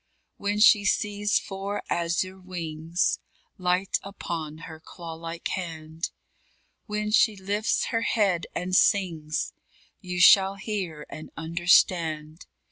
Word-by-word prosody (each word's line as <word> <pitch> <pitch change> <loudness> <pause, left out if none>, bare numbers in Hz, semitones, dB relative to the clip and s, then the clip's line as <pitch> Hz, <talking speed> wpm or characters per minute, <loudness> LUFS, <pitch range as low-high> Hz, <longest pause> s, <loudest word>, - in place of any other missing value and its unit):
_ - - -48 0.3
When 205 +1 -1
she 210 -1 +7
sees 205 +1 +1
four 195 +1 -4
azure 175 +3 -1
wings 170 -2 -2 0.4
Light 180 +2 +1
upon 165 -5 -6
her 160 -1 -10
claw 165 +1 -9
like 165 +1 -5
hand; 160 -2 -4 0.8
When 210 0 -2
she 220 0 +4
lifts 200 +3 0
her 230 -2 +1
head 195 -7 +1
and 185 +1 -1
sings, 165 -7 +1 0.5
You 180 -2 -4
shall 190 +2 +7
hear 195 -7 -4
and 155 - -8
understand. 165 -1 +2
180 Hz, 120 wpm, -26 LUFS, 165-200 Hz, 0.8 s, she